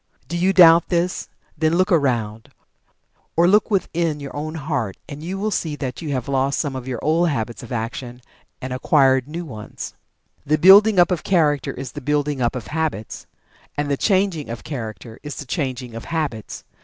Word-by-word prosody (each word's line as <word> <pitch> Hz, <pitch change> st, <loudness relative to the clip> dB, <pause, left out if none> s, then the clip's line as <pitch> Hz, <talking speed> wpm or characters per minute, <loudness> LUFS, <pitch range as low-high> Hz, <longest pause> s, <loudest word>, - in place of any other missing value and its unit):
Do 170 Hz, -, -4 dB
you 180 Hz, +3 st, +2 dB
doubt 170 Hz, -3 st, +7 dB
this? 175 Hz, 0 st, -1 dB, 0.3 s
Then 160 Hz, +1 st, +1 dB
look 185 Hz, +3 st, +2 dB
around 115 Hz, -9 st, 0 dB, 0.4 s
you -, -, -39 dB, 0.5 s
or 170 Hz, +1 st, +5 dB
look 205 Hz, +4 st, +4 dB
within 170 Hz, -6 st, 0 dB
your 140 Hz, -1 st, -8 dB
own 155 Hz, +2 st, -4 dB
heart, 140 Hz, -10 st, -3 dB
and 145 Hz, +1 st, -8 dB
you 180 Hz, +4 st, -4 dB
will 215 Hz, +2 st, -1 dB
see 160 Hz, -5 st, -2 dB
that 130 Hz, -2 st, -5 dB
you 160 Hz, -, -5 dB
have 130 Hz, -3 st, -2 dB
lost 135 Hz, 0 st, 0 dB
some 145 Hz, -4 st, -2 dB
of 130 Hz, -1 st, -6 dB
your 125 Hz, -2 st, -3 dB
old 165 Hz, +3 st, +2 dB
habits 115 Hz, -5 st, -3 dB
of 120 Hz, -, -11 dB
action, 120 Hz, +1 st, -5 dB, 0.4 s
and 130 Hz, -, -4 dB
have 130 Hz, -, -4 dB
acquired 135 Hz, -3 st, +4 dB
new 170 Hz, +3 st, -5 dB
ones. 110 Hz, -8 st, -8 dB, 0.5 s
The 155 Hz, +2 st, +1 dB
building 200 Hz, +5 st, +7 dB
up 175 Hz, +1 st, +5 dB
of 175 Hz, -4 st, -1 dB
Character 150 Hz, -7 st, +2 dB
is 130 Hz, -2 st, -7 dB
the -, -, -8 dB
building 145 Hz, 0 st, 0 dB
up 120 Hz, +1 st, +1 dB
of 120 Hz, -4 st, -5 dB
Habits. 155 Hz, -9 st, -3 dB, 0.5 s
And 145 Hz, 0 st, -1 dB
the -, -, +3 dB
changing 185 Hz, -, +1 dB
of 115 Hz, -, -6 dB
Character 110 Hz, -5 st, -7 dB
is 145 Hz, -1 st, -7 dB
the 140 Hz, -, -7 dB
changing 130 Hz, -3 st, -3 dB
of 115 Hz, -, -7 dB
Habits. 150 Hz, -10 st, -4 dB
145 Hz, 195 wpm, -21 LUFS, 125-170 Hz, 0.5 s, doubt